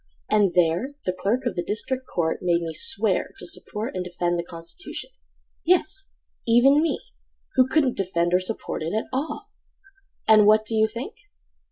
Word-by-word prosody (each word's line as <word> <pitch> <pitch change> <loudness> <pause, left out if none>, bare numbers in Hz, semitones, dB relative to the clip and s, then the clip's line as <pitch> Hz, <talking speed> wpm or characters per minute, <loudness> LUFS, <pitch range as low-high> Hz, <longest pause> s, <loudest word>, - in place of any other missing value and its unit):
And 205 -4 +3
there 180 - +2
the 185 - 0
clerk 230 +8 -1
of 240 - -1
the 175 - -1
district 255 +7 -2
Court 160 -2 -1
Made 175 -1 +1
me 165 -1 -4
swear 195 +5 +1
to - - -9
support 215 +1 -3
and 185 - -3
defend 175 -1 -1
The - - -1
constitution—yes, - - -4 0.4
even 270 +6 +5
me— 320 -3 0 0.5
Who 255 - +4
couldn't 265 -2 +2
defend 175 -2 0
or 180 - +5
support 185 -1 -4
it 165 +6 -2
at 220 - -1
all! 300 +10 -4 0.8
And 215 -1 +7
what 215 0 +5
do 225 - -5
you 220 0 +4
think? 235 +5 -6
205 Hz, 165 wpm, -24 LUFS, 170-240 Hz, 0.8 s, And